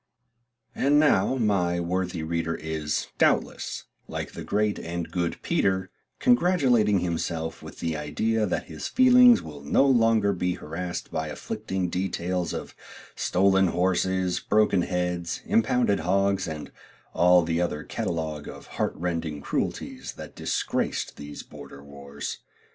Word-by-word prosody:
And 145 +2 +3
now 130 -6 +3
my 95 -7 +1
worthy 90 -1 -2
reader 80 0 -1
is, 80 -1 -2
doubtless, - - +1 0.2
like - - -5
the - - -7
great 105 0 0
and 85 0 -5
good 85 -2 -2
Peter, 95 -1 0 0.3
congratulating 135 - +3
himself 80 -1 -3
with - - -11
the 80 -2 -1
idea 105 +9 0
that 90 - -1
his 80 -2 -6
feelings 250 -1 +6
will 75 -2 -9
no 70 - +3
longer 115 -6 +4
be 90 -1 -1
harassed 90 +1 -5
by 80 0 -2
afflicting 90 +4 -3
details 90 -2 -2
of - - -6 0.4
stolen 95 +1 +3
horses, 95 +1 +1
broken 105 -3 +2
heads, 90 -1 -2
impounded 115 -2 +2
hogs, 100 +2 +1
and 80 -2 -6 0.4
all 90 +1 +5
the 85 +1 0
other 75 -4 -2
catalogue 80 -3 -3
of - - -10 0.2
heart - - 0
rending 85 -3 -3
cruelties - - -3
that - - -10
disgraced - - -2
these 75 0 -8
border 70 - -12
wars. 70 0 -7
90 Hz, 130 wpm, -26 LUFS, 80-100 Hz, 0.4 s, feelings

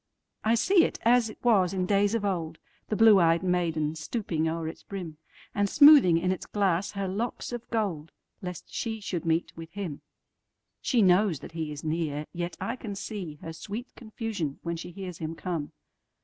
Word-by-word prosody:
I 225 +1 +3
see 360 - +4
it - - -1
as 235 -1 +4
it - - -10
was 195 -6 +3
in 185 -1 0
days 200 +2 +2
of 215 -3 -1
old, 165 -5 -2 0.3
The 215 - 0
blue 220 -3 +7
ey'd 165 +1 +3
maiden 165 -4 0
stooping 160 -1 -2
o'er 165 0 -3
its 160 - -7
brim, 175 -6 -7 0.4
And 205 0 +1
smoothing 285 - +8
in 180 +2 +1
its 185 - -4
glass 195 -2 0
her 200 -1 -2
locks 215 +8 -3
of 240 -1 -6
gold, 185 -9 -2 0.3
Lest 180 -3 -7
she 225 -1 -3
should 180 -4 -4
meet 165 +1 0
with 165 0 -9
him. 190 -8 -5 0.8
She 240 -5 +2
knows 185 -3 +3
that - - -9
he 160 -2 -4
is 150 -1 -7
near, 155 -2 -2
yet 175 0 -4
I 235 +3 -3
can 215 -4 -6
seeHer 170 -6 -6
sweet 215 +8 -7
confusion 215 - -4
when 170 0 -2
she 165 - -7
hears 180 -1 -7
him 160 0 -4
come. 165 -4 -4
185 Hz, 185 wpm, -28 LUFS, 165-215 Hz, 0.8 s, smoothing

